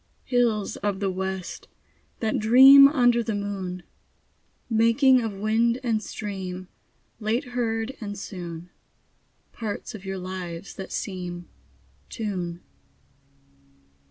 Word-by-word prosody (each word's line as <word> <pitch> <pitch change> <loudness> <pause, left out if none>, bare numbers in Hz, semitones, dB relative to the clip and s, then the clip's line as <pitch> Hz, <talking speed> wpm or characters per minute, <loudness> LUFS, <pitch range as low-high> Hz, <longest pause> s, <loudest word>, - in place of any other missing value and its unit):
Hills 235 -5 0
of 200 -1 -2
the 195 -2 0
west, 190 -1 -5 0.5
that 220 -2 0
dream 265 +5 +9
Under 245 -4 +3
the 225 -2 -2
moon, 190 -3 -4 0.8
Making 235 +3 +4
of 225 -2 -2
wind 225 +4 +1
and 225 -3 0
stream, 190 -4 -6 0.5
Late 225 +3 0
heard 235 0 -2
and 205 -1 -5
soon, 175 -3 -7 0.8
Parts 215 -3 -5
of 210 -3 -9
your 195 -1 -4
lives 180 -1 -6
that 190 - -8
seem 180 -3 -5 0.6
Tune. 180 -6 -4
210 Hz, 105 wpm, -25 LUFS, 185-230 Hz, 0.8 s, dream